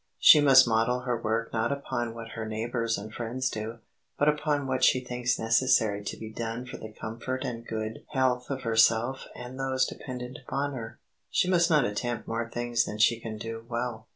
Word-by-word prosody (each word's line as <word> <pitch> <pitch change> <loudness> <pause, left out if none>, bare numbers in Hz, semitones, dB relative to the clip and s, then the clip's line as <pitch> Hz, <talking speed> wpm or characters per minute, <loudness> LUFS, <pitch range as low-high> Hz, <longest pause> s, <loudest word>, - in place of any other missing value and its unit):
She 150 - +8
must 135 -3 +7
model 115 +2 +2
her 120 -2 -2
work 115 +1 -1
not 115 +2 0
upon 120 -4 -3
what 115 -1 -8
her 115 0 -5
neighbors 115 +1 -1
and 105 +2 -8
friends 125 +3 -2
do, 110 +2 -5 0.4
but 145 - +2
upon 150 -1 +1
what 130 -1 -1
she 130 - +5
thinks 125 -1 -1
necessary 115 -3 +2
to - - -4
be 110 0 -8
done 115 +2 -4
for 125 - -8
the 110 - -9
comfort 120 +4 -5
and 115 -1 -5
good 110 0 -4
health 130 -3 +1
of 135 -1 -3
herself 115 +3 +3
and 125 +2 -8
those 130 -1 +1
dependent 125 -2 -7
upon 140 +2 -2
her. 115 -4 -7 0.3
She - - +2
must 175 -2 +3
not 150 -6 +4
attempt 120 +3 -3
more 115 +1 -2
things 120 0 0
than 105 - -5
she 115 +2 +4
can 110 -2 -6
do 115 +1 -6
well. 120 -1 -3
120 Hz, 195 wpm, -28 LUFS, 115-130 Hz, 0.4 s, She